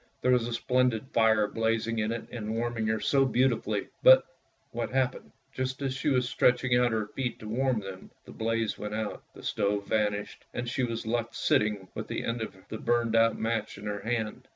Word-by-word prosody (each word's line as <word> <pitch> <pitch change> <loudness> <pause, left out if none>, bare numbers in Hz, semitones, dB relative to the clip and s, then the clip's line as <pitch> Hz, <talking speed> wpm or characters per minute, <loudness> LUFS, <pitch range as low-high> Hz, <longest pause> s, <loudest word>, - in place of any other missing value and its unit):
There 125 - +4
was 125 -2 +3
a 120 - -3
splendid 125 -1 +1
fire 110 -2 +4
blazing 115 0 0
in 110 +1 0
it 115 0 -4
and 110 -2 -4
warming 115 -1 -1
her 110 0 +1
so 135 +5 +3
beautifully, 130 0 +1
but - - +8 0.2
— - - -41
what - - -3
happened 130 -1 -1
— - - -41
just 130 0 -3
as 135 -1 0
she 140 +3 -1
was 125 -2 +2
stretching 125 -1 +3
out 125 -1 +3
her 110 -1 0
feet 125 -3 -3
to 110 - -9
warm 125 0 +1
them, 95 -1 -9
— - - -41
the - - -11
blaze 115 -1 -1
went 105 0 -4
out, 110 -1 -4
the - - -12
stove 100 0 0
vanished, 105 -1 -1
and 120 0 -3
she 130 +2 -1
was 115 -2 -2
left 115 +1 -2
sitting 105 -3 +1
with - - -5
the - - -3
end 115 0 -2
of 110 - -5
the 110 - -5
burnt 120 -1 +1
out 115 0 +4
match 110 -2 -2
in 100 - -9
her 105 0 -3
hand. 110 0 -3
115 Hz, 220 wpm, -29 LUFS, 110-125 Hz, 0.2 s, but